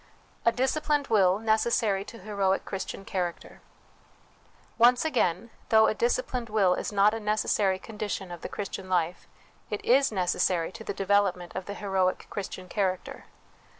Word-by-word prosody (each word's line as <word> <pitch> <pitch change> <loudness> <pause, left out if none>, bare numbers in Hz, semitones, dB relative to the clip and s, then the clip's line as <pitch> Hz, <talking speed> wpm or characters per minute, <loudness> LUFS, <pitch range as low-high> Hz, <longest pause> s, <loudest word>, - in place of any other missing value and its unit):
A 230 - +6
Disciplined 290 +3 0
Will 195 -4 +4
necessary 220 -2 +1
to 230 - -10
Heroic 195 -2 -1
Chris 195 - -4
tian 195 - -8
Character. 180 -3 -4 1.2
Once 245 +4 +5
again, 230 - 0 0.2
though 220 0 +6
a - - +2
disciplined 240 +1 -1
will 200 -4 +3
is - - -3
not 205 +1 +4
a 225 - -3
necessary 210 -2 +1
condition 205 -2 -5
of 175 -2 -8
the - - -5
Christian 195 -2 -6
life, 175 -1 -1 0.4
it 210 - -4
is 270 +2 +4
necessary 180 -3 0
to 220 - -10
the 200 - -4
development 195 -3 +1
of 190 0 -5
the 200 - -5
heroic 190 -3 0
Christian 190 -2 -6
character. 185 -1 -2
200 Hz, 150 wpm, -27 LUFS, 185-225 Hz, 1.2 s, A